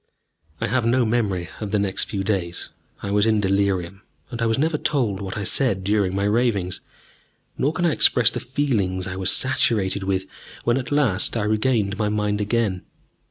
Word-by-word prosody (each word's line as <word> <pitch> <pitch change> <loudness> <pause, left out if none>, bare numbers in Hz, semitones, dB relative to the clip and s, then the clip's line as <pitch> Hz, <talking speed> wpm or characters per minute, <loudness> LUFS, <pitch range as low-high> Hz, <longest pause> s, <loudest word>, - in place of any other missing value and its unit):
I - - -1
have 125 +3 0
no 120 +1 +3
memory 105 -7 0
of 105 - -4
the 105 - +1
next 100 -2 0
few 100 -2 -2
days. 95 -4 -2 0.3
I 100 - -3
was 105 +2 +3
in 110 -1 +3
delirium, 100 -1 0 0.3
and 120 -1 -5
I 115 - +2
was 115 - +1
never 155 +2 +1
told 120 - 0
what 95 0 -5
I 105 - -3
said 100 -1 0
during 100 -1 +1
my 100 - 0
ravings. 105 -4 0 0.7
Nor 140 - +1
can 175 - -1
I 170 - +3
express 125 -5 +4
the - - -4
feelings 115 -9 -1
I 95 - -5
was 95 -1 +2
saturated 110 -7 +1
with 95 0 -1 0.4
when 120 +1 +2
at 130 +1 -4
last 120 -8 +2
I 110 - 0
regained 105 -1 0
my 105 -1 +1
mind 105 0 -1
again. 105 -3 0
105 Hz, 190 wpm, -23 LUFS, 95-120 Hz, 0.7 s, express